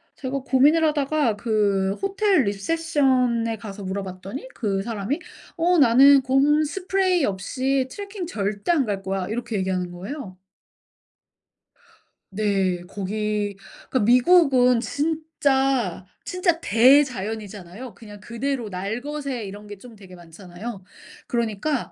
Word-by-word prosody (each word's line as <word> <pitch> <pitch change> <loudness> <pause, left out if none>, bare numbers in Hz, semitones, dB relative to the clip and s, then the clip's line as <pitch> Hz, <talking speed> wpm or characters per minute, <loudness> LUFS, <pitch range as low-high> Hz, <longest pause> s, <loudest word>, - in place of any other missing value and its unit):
제가 270 0 -4
고민을 275 +5 +3
하다가 295 -5 +1
그 205 -3 +1
호텔 390 -4 +2
리셉션에 250 0 0
가서 205 -2 -8
물어봤더니 195 - -6
그 195 -4 -1
사람이 230 - -3 0.4
"어 350 +2 +3
나는 275 +2 +7
곰 280 +4 +3
스프레이 370 +1 0
없이 260 +7 -1
트래킹 400 0 -6
절대 205 - -2
안 300 -6 +2
갈 200 -3 -3
거야." 190 -1 -2
이렇게 230 0 -3
얘기하는 185 -2 -2
거예요. 190 +2 -8 1.9
네. 195 -3 0
거기 205 +1 -3 0.3
그러니까 260 - +1
미국은 250 - +5
진짜 275 - 0 0.2
진짜 360 -2 0
대자연이잖아요. 220 - +1
그냥 205 0 -13
그대로 235 +3 -3
날것의 245 +6 -4
이런 205 +2 -9
게 205 0 -9
좀 235 +3 -14
되게 195 -3 -15
많잖아요. 180 +5 -9 0.4
그러니까 235 +4 -2
235 Hz, 270 characters per minute, -23 LUFS, 200-280 Hz, 1.9 s, 나는